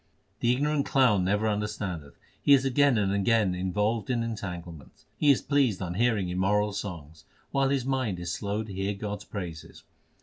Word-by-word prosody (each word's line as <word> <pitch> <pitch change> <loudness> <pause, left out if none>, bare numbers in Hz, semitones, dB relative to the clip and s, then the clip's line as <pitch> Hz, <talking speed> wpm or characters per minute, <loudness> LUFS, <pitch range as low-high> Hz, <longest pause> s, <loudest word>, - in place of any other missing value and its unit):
The 120 - +2
ignorant 145 +3 0
clown 120 -9 +3
never 105 +3 +1
understandeth. 100 -7 -3 0.2
He 145 - +5
is 135 -1 +4
again 135 -1 +3
and 100 -2 +1
again 100 -1 +2
involved 105 +4 -1
in 120 -2 +1
entanglements. 90 - -7
He 150 - +2
is 140 - +4
pleased 135 -9 +2
on 90 -2 -3
hearing 105 -3 +1
immoral 100 +3 +1
songs, 80 -6 -7 0.3
While 135 -1 +2
his 135 -2 0
mind 130 -8 -1
is 85 -1 -3
slow 105 +2 -2
to 105 -3 -9
hear 95 +2 -2
God 105 +1 -4
s 100 - -14
praises. 85 -6 -7
105 Hz, 175 wpm, -28 LUFS, 95-120 Hz, 0.3 s, He